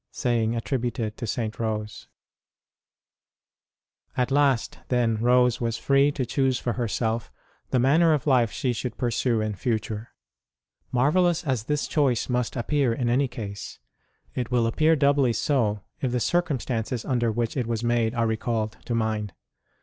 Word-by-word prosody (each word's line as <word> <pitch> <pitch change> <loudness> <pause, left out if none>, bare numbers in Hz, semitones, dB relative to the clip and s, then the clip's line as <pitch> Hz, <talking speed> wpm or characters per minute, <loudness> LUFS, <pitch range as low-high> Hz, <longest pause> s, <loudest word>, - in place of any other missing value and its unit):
(Saying 115 -2 0
attributed 115 -2 -2
to 120 - -4
St. 110 +1 -3
Rose.} 110 -2 -3 2.1
|jT 125 +1 +1
last, 135 -4 +2
then, 120 -3 +1
Rose 125 +1 +3
was 115 -1 -1
free 140 +1 +3
to 130 - -2
choose 130 +1 +1
for 120 -1 -2
herself 115 -1 -2 0.4
the - - +1
manner 155 +7 +4
of 150 -4 +1
life 125 -6 +4
she 125 -2 -1
should 120 0 -4
pursue 120 -1 0
in 110 0 -1
future. 110 +1 -3 0.8
Marvellous 165 +7 +2
as 130 -8 -1
this 150 +1 0
choice 135 -6 +1
must 125 -2 -1
appear 135 +1 +1
in 120 0 -1
any 135 +3 +2
case, 105 -5 -7 0.6
it 125 -2 -3
will 120 -2 +2
appear 155 +8 +3
doubly 140 -4 +3
so 110 -7 0 0.2
if 130 - 0
the 125 - 0
circumstances 125 -7 -1
under 120 -3 +1
which 115 0 -2
it 125 -4 -1
was 115 -1 -2
made 120 -1 +1
are 115 -1 +1
recalled 110 -1 -1
to 120 - -2
mind. 110 -4 -1
120 Hz, 150 wpm, -25 LUFS, 115-130 Hz, 2.1 s, manner